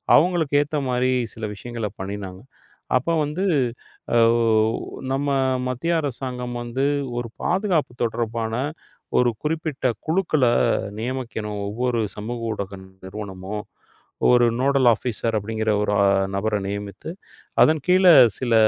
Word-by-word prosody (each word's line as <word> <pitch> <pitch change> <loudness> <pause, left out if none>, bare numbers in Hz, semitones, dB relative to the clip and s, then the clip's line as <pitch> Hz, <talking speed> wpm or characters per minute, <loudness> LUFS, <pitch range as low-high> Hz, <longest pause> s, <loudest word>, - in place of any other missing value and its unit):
அவுங்களுக்கு 160 -4 +3
ஏத்த 150 +1 -2
மாரி 125 +1 +1 0.2
சில 110 - -10
விஷயங்கள 115 0 -5
பண்ணினாங்க. 95 -1 -6 0.6
அப்ப 130 +7 -3 0.2
வந்து 165 +7 -2 0.7
ஆ, - - +5 1.0
நம்ம 140 +2 -1 0.4
மத்திய 150 +7 -1
அரசாங்கம் 125 -3 -4
வந்து 130 +3 -1 0.3
ஒரு 120 -1 -5
பாதுகாப்பு 180 - +1
தொடர்பான 115 0 -2 0.7
ஒரு 125 - +4
குறிப்பிட்ட 155 -3 -2 0.2
குழுக்கள 160 -4 +1 0.6
நியமிக்கணும். 115 -4 -4
ஒவ்வொரு 120 +2 -1 0.2
சமூக 115 +3 -5
ஊடக 100 -1 -5 0.3
நிறுவனமும் 100 +1 -6 0.7
ஒரு 120 -1 +6
நோடள் 135 -1 +3
ஆபிசர் 115 0 -1
அப்டிங்கிற 110 +1 -1
ஒரு 105 0 0 0.4
நபர 105 +1 0
நியமித்து 100 - -5 0.5
அதன் 155 -1 +5
கீழ 185 +1 +4 0.3
சில 120 -3 -1
120 Hz, 110 wpm, -23 LUFS, 105-145 Hz, 1.0 s, ஒரு